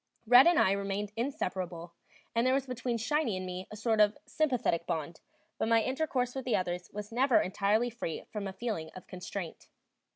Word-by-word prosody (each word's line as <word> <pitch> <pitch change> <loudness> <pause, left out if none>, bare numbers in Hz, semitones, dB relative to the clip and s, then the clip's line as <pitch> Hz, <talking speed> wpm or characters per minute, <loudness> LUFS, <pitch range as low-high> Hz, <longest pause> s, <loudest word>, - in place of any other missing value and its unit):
"Red" 245 +6 +8
and 345 -2 +5
I 190 - +5
remained 200 +1 -2
inseparable, 180 -9 -3 0.4
and 230 - +2
there 260 - +4
was 270 -1 0
between 250 -2 -2
"Shiny" 245 -2 0
and 185 - -4
me 185 0 -5
a - - -8
sort 220 0 0
of 210 0 +4
sympathetic 250 - 0
bond, 165 -1 -3 0.4
but - - +1
my 230 -1 +4
intercourse 260 -3 -1
with 265 - -4
the 250 - +2
others 180 -1 -2
was 210 +1 -7
never 255 +1 +4
entirely 210 +5 +1
free 220 -8 -4
from 210 -2 -4
a - - -4
feeling 200 -8 -3
of 185 - -10
constraint. 180 -1 -7
215 Hz, 190 wpm, -31 LUFS, 185-250 Hz, 0.4 s, Red